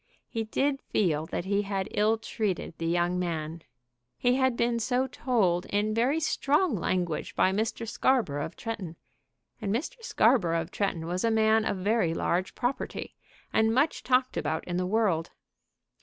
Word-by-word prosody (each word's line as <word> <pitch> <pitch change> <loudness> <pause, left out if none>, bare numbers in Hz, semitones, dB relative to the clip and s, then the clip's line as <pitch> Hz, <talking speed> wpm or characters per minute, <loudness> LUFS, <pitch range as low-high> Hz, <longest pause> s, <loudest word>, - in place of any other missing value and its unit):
He 225 -2 -3
did 275 +5 0
feel 160 -6 0
that 175 - -3
he 200 +1 +1
had 195 -2 -2
ill 215 +2 +2
treated 210 -6 -3
the 165 - -2
young 175 +1 +1
man. 165 -2 -3 0.6
He 245 - +2
had 260 -2 +2
been 235 0 +1
so 250 +3 +1
told 215 -9 0
in 210 +1 0
very 250 +8 +2
strong 300 0 +1
language 175 -3 -2
by 185 - +3
Mr. 220 +3 -2
Scarborough 220 - +1
of - - -9
Tretton, 200 -8 -5 0.7
and 200 -2 -1
Mr. 310 - -3
Scarborough 175 - +3
of 165 +2 -8
Tretton 185 -5 -1
was 180 +2 -2
a 230 - +3
man 220 0 +3
of - - -1
very 185 -3 +1
large 180 +3 -1
property, 245 +3 -3 0.4
and 220 +1 +3
much 285 +5 +2
talked 255 0 +1
about 155 +1 -1
in 175 -1 -3
the 180 0 0
world. 195 -6 +1
210 Hz, 165 wpm, -28 LUFS, 175-240 Hz, 0.7 s, by